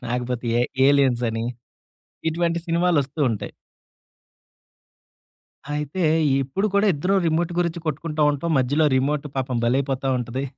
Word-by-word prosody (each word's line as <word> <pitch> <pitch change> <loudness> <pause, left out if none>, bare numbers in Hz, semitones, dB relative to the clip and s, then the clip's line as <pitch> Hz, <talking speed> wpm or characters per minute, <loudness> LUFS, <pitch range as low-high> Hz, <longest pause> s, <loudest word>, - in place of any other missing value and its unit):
లాకపోతే 125 0 -3
ఏ - - +3 0.2
'ఏలియన్స్' 135 -4 +3
అని. 115 0 -3 0.9
ఇటువంటి 170 +1 0
సినిమాలొస్తూ 165 -4 +1
ఉంటాయి. 110 - -4 2.2
అయితే 150 +5 -3 0.4
ఇప్పుడు 140 +11 -1
కూడా 200 +1 +3
ఇద్దరం 185 +7 +1
రిమోట్ 165 +2 0
గురించి 170 -1 -1
కొట్టుకుంటా 155 +1 -2
ఉంటాం. 145 +4 -3
మధ్యలో 145 +5 +2
రిమోట్ 145 +2 0
పాపం 130 -2 -1
బలేైపోతా 135 +2 0
ఉంటది. 125 +3 -4
145 Hz, 115 wpm, -23 LUFS, 130-165 Hz, 2.2 s, ఏ